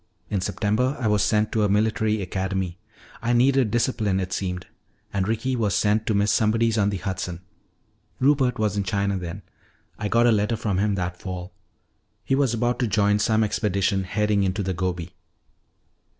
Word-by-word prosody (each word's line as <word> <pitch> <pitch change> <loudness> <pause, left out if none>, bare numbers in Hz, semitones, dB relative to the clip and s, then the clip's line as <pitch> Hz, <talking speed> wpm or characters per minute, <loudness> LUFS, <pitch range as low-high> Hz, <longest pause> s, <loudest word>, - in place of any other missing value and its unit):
In 100 - 0
September 115 +8 0
I 125 - -3
was 105 -1 +2
sent 105 0 +2
to 110 - +1
a 105 - +2
military 110 0 +1
academy. 95 -1 -3 0.4
I 120 +2 +1
needed 130 0 +3
discipline, 110 -4 0
it 90 -1 -3
seemed. 90 -2 -3 0.5
And 100 -1 0
Ricky 120 +4 -1
was 105 -6 0
sent 105 +2 +1
to 110 - +1
Miss 100 0 +2
Somebody's 115 +2 +2
on 100 -2 +2
the 100 - -2
Hudson. 90 -2 -4 0.8
Rupert 135 -2 +3
was 105 -2 0
in 100 - 0
China 100 +1 0
then. 90 +1 -6 0.6
I 105 - -1
got 115 +3 +3
a 120 - +5
letter 105 +1 +1
from 105 -4 -1
him 105 0 +1
that 90 -1 -3
fall. 90 0 -6 0.7
He - - -1
was 135 -3 +2
about 120 +1 0
to 125 - +1
join 105 0 +2
some 110 +1 +2
expedition 100 -2 0
heading 105 +2 +1
into 95 +1 0
the 95 0 -1
Gobi. 90 -1 -3
105 Hz, 180 wpm, -24 LUFS, 95-115 Hz, 0.8 s, a